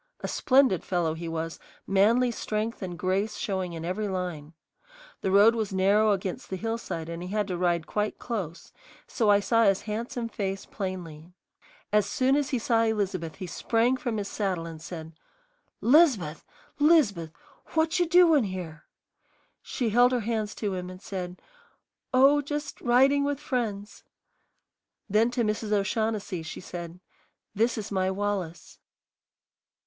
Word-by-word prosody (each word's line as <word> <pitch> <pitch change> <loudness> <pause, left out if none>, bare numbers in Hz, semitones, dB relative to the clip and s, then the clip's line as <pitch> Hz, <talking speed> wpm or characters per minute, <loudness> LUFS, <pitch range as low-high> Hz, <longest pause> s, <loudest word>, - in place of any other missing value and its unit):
A - - -3
splendid 260 - +3
fellow 175 -3 0
he 165 +1 -6
was, 165 0 -4 0.3
manly 225 +6 +3
strength 220 0 -3
and 180 -3 -5
grace 190 +5 -1
showing 190 -5 -2
in 165 0 -6
every 200 +4 -2
line. 175 -5 -4 0.7
The - - 0
road 205 +4 +6
was 220 -3 -2
narrow 200 +3 +3
against 190 -2 -3
the 190 - -3
hillside 225 -6 -4
and 170 0 -6
he 180 - -6
had 210 0 -1
to 180 - -1
ride 175 -2 0
quite 210 0 -2
close, 190 -9 -5 0.3
so 220 -4 0
I 205 0 +6
saw 230 +3 +2
his 195 -2 +3
handsome 230 +2 -4
face 195 -3 -4
plainly. 175 -5 -6 0.6
As 210 -2 +3
soon 265 +1 +2
as 290 -2 0
he 265 - 0
saw 230 0 +2
Elizabeth 200 -7 -1
he 185 - -6
sprang 230 +7 +1
from 245 -4 -3
his 205 -1 -3
saddle 190 -6 -2
and 165 -1 -8
said, 160 -1 -8 0.7
"'Liz'beth, 235 - +4 0.4
'Liz'beth, 245 - +3 0.4
what 320 +2 +2
you 350 - +2
doin' 330 -6 +5
here?" 180 -4 -6 0.8
She 240 -3 -2
held 245 +3 +5
her 245 - +1
hands 220 -1 -2
to 205 -3 -2
him 180 -1 -4
and 185 0 -10
said, 180 -2 -6 0.7
"Oh, 275 +3 +5
just 290 0 -5
riding 270 +4 +4
with 285 -1 -1
friends." 225 -7 -3 1.0
Then 220 +3 +3
to 240 -1 -1
Mrs. 215 0 -2
O'Shaughnessy 210 -2 -1
she 160 - -7
said, 175 -1 -8 0.5
"This 225 +4 +1
is 215 -1 -5
my 190 -1 +1
Wallace." 190 -4 -3
205 Hz, 155 wpm, -27 LUFS, 180-235 Hz, 1.0 s, road